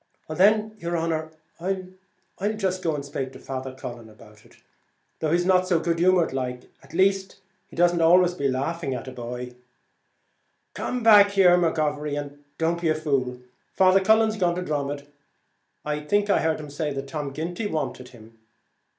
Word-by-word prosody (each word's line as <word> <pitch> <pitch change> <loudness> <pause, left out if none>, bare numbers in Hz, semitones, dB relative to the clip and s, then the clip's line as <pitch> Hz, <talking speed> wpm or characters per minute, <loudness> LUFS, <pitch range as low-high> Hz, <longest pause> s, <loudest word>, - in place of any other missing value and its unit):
"Well 155 - -5
then, 215 +4 +3
yer 170 -1 -3
honer, 160 -1 -1 0.3
I'll 190 +2 -5
jist 185 -3 -1
go 160 -3 0
and 140 -1 -5
spake 135 -2 -5
to - - -11
Father 130 0 -5
Cullen. 120 -3 -8
Though 110 +7 -11
he 165 - +3
is 175 0 +1
not 185 0 +3
so 175 -3 +2
good 165 0 -1
humoured 180 -3 +3
like, 125 -2 -4
at 135 +4 -14
least, 195 +1 +1 0.3
he - - -15
don't 175 +1 +3
be - - +1
always 175 +2 +5
laughing 140 +2 -1
at 125 +1 -7
a - - -6
boy." 125 0 -6 1.2
"Come 250 -1 -3
back, 210 -3 +8
McGovery, 155 -6 +2
and 145 0 -9
don't 165 +1 0
be 165 - +1
a 155 - +2
fool. 135 -5 -1 0.3
Father 190 0 +5
Cullen's 220 +2 +3
gone 175 -3 +1
to 180 - -3
Dromod. 145 -3 -3 0.8
I 150 0 -1
think 205 +7 +1
I - - +4
heard 160 -1 0
him 150 -2 -8
say 145 -1 -3
Tom 140 0 -5
Ginty 175 +8 -4
wanted 140 -7 -4
him." 115 -2 -17
160 Hz, 165 wpm, -25 LUFS, 140-185 Hz, 1.2 s, back